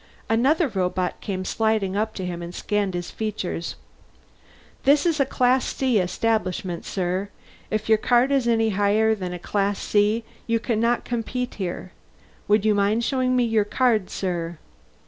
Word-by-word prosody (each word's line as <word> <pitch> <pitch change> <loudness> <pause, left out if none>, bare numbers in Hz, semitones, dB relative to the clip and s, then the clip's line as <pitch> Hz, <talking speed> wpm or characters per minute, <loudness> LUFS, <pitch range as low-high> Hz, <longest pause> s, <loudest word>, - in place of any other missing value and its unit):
Another 275 +9 +3
robot 185 -4 -2
came 185 -2 -3
sliding 220 -3 0
up 215 +1 -1
to 190 - -4
him 175 -1 -4
and 170 +1 -7
scanned 205 -3 -1
his 175 0 -4
features. 210 -6 -4 1.1
"This 285 +3 +4
is 330 -3 +1
a 275 - +3
Class 255 0 +2
C 255 -5 +2
establishment, 185 -2 -1
sir. 185 +1 -2 0.4
If 215 0 -2
your 220 -1 +4
card 245 +4 +3
is 270 -3 +2
any 225 -1 +3
higher 210 +2 +2
than 180 -4 -4
Class 200 +3 -1
C 210 +2 +1 0.2
you 230 0 +2
cannot 235 +1 0
compete 245 +1 -3
here. 180 0 -4 0.6
Would 210 0 +3
you 215 - +4
mind 205 +3 +2
showing 255 0 +1
me 250 - +3
your 225 -2 +2
card, 220 -2 +1
sir?" 175 -3 -3
215 Hz, 155 wpm, -24 LUFS, 190-235 Hz, 1.1 s, This